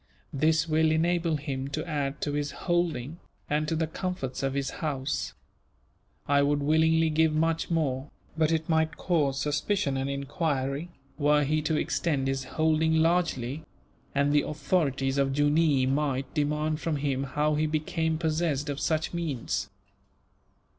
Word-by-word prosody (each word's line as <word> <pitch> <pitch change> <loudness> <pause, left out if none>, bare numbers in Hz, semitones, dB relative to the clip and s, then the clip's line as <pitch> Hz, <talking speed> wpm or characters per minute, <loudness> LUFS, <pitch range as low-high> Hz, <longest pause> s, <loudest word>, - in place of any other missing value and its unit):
This 160 +3 +2
will 160 0 +3
enable 165 0 +1
him 135 -2 -4
to 155 +4 -4
add 145 -2 -2
to 145 - -1
his 145 0 -1 0.2
holding, 170 -4 0 0.3
and 150 +1 0
to 165 - 0
the 160 0 +1
comforts 160 -5 -4
of 135 0 -1
his 140 -1 -1
house. 140 -3 -2 0.9
I 140 0 +4
would 145 +1 +2
willingly 160 +2 +3
give 160 0 +3
much 165 +1 0
more, 145 -5 -1 0.3
but 160 0 +2
it 160 -1 0
might 160 0 +1
cause 145 -6 +1
suspicion 150 0 0
and 135 +1 -2
enquiry, 140 +2 -2 0.3
were 150 0 +4
he 155 +2 +1
to 150 +1 0
extend 145 -6 0
his 135 0 -1
holding 160 +2 +2
largely; 160 -5 +1 0.5
and 140 +1 +2
the 145 - +5
authorities 140 -3 0
of 135 -1 +1
Jooneer 145 -2 +3
might 135 -1 -1
demand 150 +1 0
from 165 -2 -1
him 140 -2 -1
how 150 +3 0
he 155 +1 +1
became 160 +1 -1
possessed 155 -3 0
of 140 - -4
such 160 +1 0
means. 160 -8 -2
150 Hz, 150 wpm, -28 LUFS, 140-160 Hz, 0.9 s, the